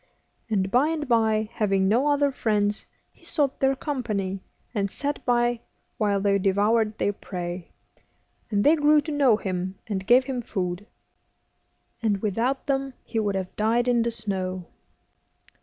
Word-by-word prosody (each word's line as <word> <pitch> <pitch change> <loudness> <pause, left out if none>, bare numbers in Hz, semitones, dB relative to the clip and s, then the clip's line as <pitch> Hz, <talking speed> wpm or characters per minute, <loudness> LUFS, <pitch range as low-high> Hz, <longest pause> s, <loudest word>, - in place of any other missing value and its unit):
And 195 -3 0
by 255 +5 +4
and 315 -2 -2
by, 220 -2 +2
having 195 -4 +1
no 240 +8 +3
other 285 -1 +3
friends, 210 -4 0 0.2
he - - -27
sought 285 -4 -1
their 270 0 +3
company, 215 -10 -3 0.3
and 200 -3 0
sat 290 +7 -4
by 240 -1 +2 0.4
while 205 -2 +2
they 200 0 +2
devoured 210 +3 +2
their 205 - 0
prey, 175 -2 -6 0.8
and 205 -2 +1
they 300 +3 +6
grew 300 0 +5
to 305 +2 -6
know 275 -7 +4
him, 185 -2 -3
and 195 -2 -4
gave 250 +2 +6
him 255 -1 -3
food. 185 -2 -4 1.1
And 210 -3 +1
without 230 +6 -1
them 270 -1 -1
he 225 - -3
would 205 -2 0
have 190 -1 -4
died 230 +3 +1
in 240 -1 +3
the 235 - +1
snow. 185 -5 -3
220 Hz, 155 wpm, -25 LUFS, 195-255 Hz, 1.1 s, they